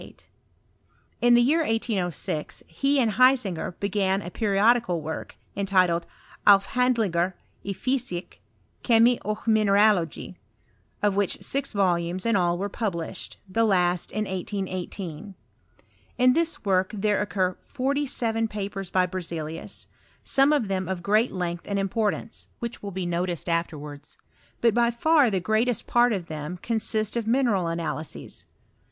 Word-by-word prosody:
Id -, -, -14 dB, 1.0 s
thft 240 Hz, 0 st, +5 dB
year 310 Hz, +6 st, +3 dB
1806 200 Hz, -, -2 dB
he 275 Hz, -, +1 dB
and 230 Hz, -4 st, +2 dB
Hismger 250 Hz, -10 st, +3 dB
be^an 200 Hz, -1 st, 0 dB
a 175 Hz, -, -6 dB
periodical 210 Hz, -2 st, +2 dB
woi^, 160 Hz, +1 st, -5 dB, 0.3 s
entitled 185 Hz, -4 st, +2 dB, 0.4 s
"Afhandlingar 200 Hz, -3 st, +3 dB, 0.3 s
1 200 Hz, -, -4 dB
Fysik, 240 Hz, -5 st, -3 dB, 0.4 s
Kemi 235 Hz, 0 st, +4 dB
och 215 Hz, 0 st, -4 dB
Mine 220 Hz, -1 st, +3 dB
ralogi," 200 Hz, -4 st, +2 dB, 0.7 s
of 205 Hz, -2 st, +2 dB
which 200 Hz, -2 st, +1 dB
sis 275 Hz, 0 st, -1 dB
volumes 180 Hz, -2 st, 0 dB
in 230 Hz, -2 st, +2 dB
all 175 Hz, -2 st, +2 dB
were 200 Hz, +3 st, -2 dB
published, 185 Hz, -5 st, -4 dB
the 225 Hz, +5 st, +1 dB
last 180 Hz, -4 st, +2 dB
in 215 Hz, +1 st, -2 dB
1818. 190 Hz, -2 st, -5 dB, 0.8 s
In 250 Hz, 0 st, +5 dB
this 330 Hz, -4 st, 0 dB
work 185 Hz, -1 st, +2 dB
there 205 Hz, 0 st, +1 dB
occur 185 Hz, -3 st, 0 dB
foTty 280 Hz, +1 st, -1 dB
seven 225 Hz, -3 st, +1 dB
papers 195 Hz, -2 st, -5 dB
by 185 Hz, 0 st, +2 dB
EerzcUus, 165 Hz, -3 st, -6 dB, 0.4 s
some 275 Hz, +2 st, +3 dB
of 285 Hz, -8 st, +2 dB
them 190 Hz, -2 st, -2 dB
of 185 Hz, -2 st, -4 dB
^jeat 215 Hz, +6 st, +3 dB
length 175 Hz, -2 st, -4 dB
and 200 Hz, -, -1 dB
importance, 210 Hz, +3 st, -2 dB
which 235 Hz, 0 st, -6 dB
will 205 Hz, -, -5 dB
be 190 Hz, -1 st, -4 dB
noticed 175 Hz, 0 st, -2 dB
afterwards; 150 Hz, -4 st, -4 dB, 0.4 s
but 230 Hz, -2 st, +4 dB
by 235 Hz, +1 st, +3 dB
far 285 Hz, +3 st, +3 dB
the 195 Hz, -3 st, 0 dB
greatest 220 Hz, +6 st, 0 dB
part 240 Hz, 0 st, +3 dB
of 190 Hz, -5 st, -2 dB
them 155 Hz, +2 st, -6 dB
consist 220 Hz, -1 st, -1 dB
of 230 Hz, -2 st, -2 dB
mi 250 Hz, +4 st, +3 dB
neral 190 Hz, -8 st, +1 dB
analyses. 165 Hz, -2 st, -5 dB
200 Hz, 140 wpm, -25 LUFS, 180-230 Hz, 1.0 s, thft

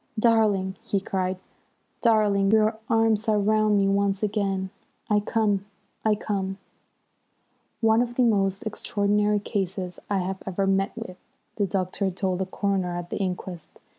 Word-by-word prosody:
"Darling!" 215 Hz, -4 st, +2 dB
he 200 Hz, -, -1 dB
cried. 190 Hz, -1 st, -2 dB, 0.6 s
"Darling, 210 Hz, -4 st, +3 dB
your 220 Hz, +1 st, +3 dB
arms 225 Hz, -1 st, +2 dB
are 215 Hz, -, +3 dB
round 215 Hz, 0 st, +3 dB
me 195 Hz, -1 st, +3 dB
once 200 Hz, 0 st, +1 dB
again! 195 Hz, -2 st, -1 dB, 0.4 s
I 210 Hz, -, +5 dB
come! 205 Hz, -2 st, 0 dB, 0.4 s
I 215 Hz, -1 st, +3 dB
come!" 195 Hz, -2 st, -3 dB, 1.2 s
"One 225 Hz, 0 st, +4 dB
of 240 Hz, 0 st, -2 dB
the 255 Hz, -, +3 dB
most 195 Hz, -2 st, +2 dB
extraordinary 210 Hz, -1 st, +1 dB
cases 190 Hz, -3 st, -3 dB
I 200 Hz, -, +1 dB
have 190 Hz, +1 st, -4 dB
ever 195 Hz, +1 st, 0 dB
met 195 Hz, +3 st, +1 dB
with," 185 Hz, -6 st, -7 dB, 0.4 s
the 205 Hz, -2 st, +1 dB
doctor 190 Hz, +1 st, -1 dB
told 185 Hz, 0 st, -2 dB
the 190 Hz, -, -1 dB
coroner 190 Hz, -3 st, -1 dB
at 175 Hz, 0 st, -7 dB
the -, -, -2 dB
inquest. 180 Hz, -3 st, -5 dB
200 Hz, 145 wpm, -25 LUFS, 190-215 Hz, 1.2 s, I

